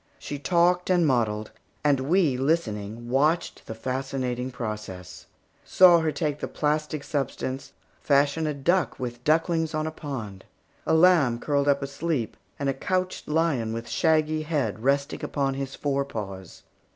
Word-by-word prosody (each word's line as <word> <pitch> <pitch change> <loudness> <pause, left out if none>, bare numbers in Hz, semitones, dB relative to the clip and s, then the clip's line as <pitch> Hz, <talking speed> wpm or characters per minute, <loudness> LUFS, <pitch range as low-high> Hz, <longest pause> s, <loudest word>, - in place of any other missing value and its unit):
She 145 - -6
talked 175 +3 +2
and 175 -2 +4
modelled, 110 -6 0 0.3
and 145 -2 +3
we 155 +1 +2
listening 120 -6 -1
watched 150 +7 0
the 110 - -6
fascinating 130 0 -3
process; 105 -7 -7 0.4
saw 180 -2 +6
her 160 -1 0
take 150 0 -2
the - - -3
plastic 150 -1 -1
substance, 135 -2 -3 0.3
fashion 145 +2 +2
a 150 - -1
duck 170 +4 +1
with 120 -1 -5
ducklings 160 +1 +1
on 155 0 -1
a 160 - -2
pond, 120 - -7 0.4
a 160 - +4
lamb 160 -8 +5
curled 140 +2 0
up 140 -1 +2
asleep, 140 -3 -2 0.2
and 140 - -2
a 135 - +2
couched 185 +6 -2
lion 150 -8 +1
with 115 +1 -5
shaggy 155 -1 +2
head 145 -9 -1
resting 140 +2 0
upon 135 -2 -1
his 135 0 -5
fore 140 -1 0
paws. 95 -8 -7
140 Hz, 150 wpm, -26 LUFS, 125-160 Hz, 0.4 s, saw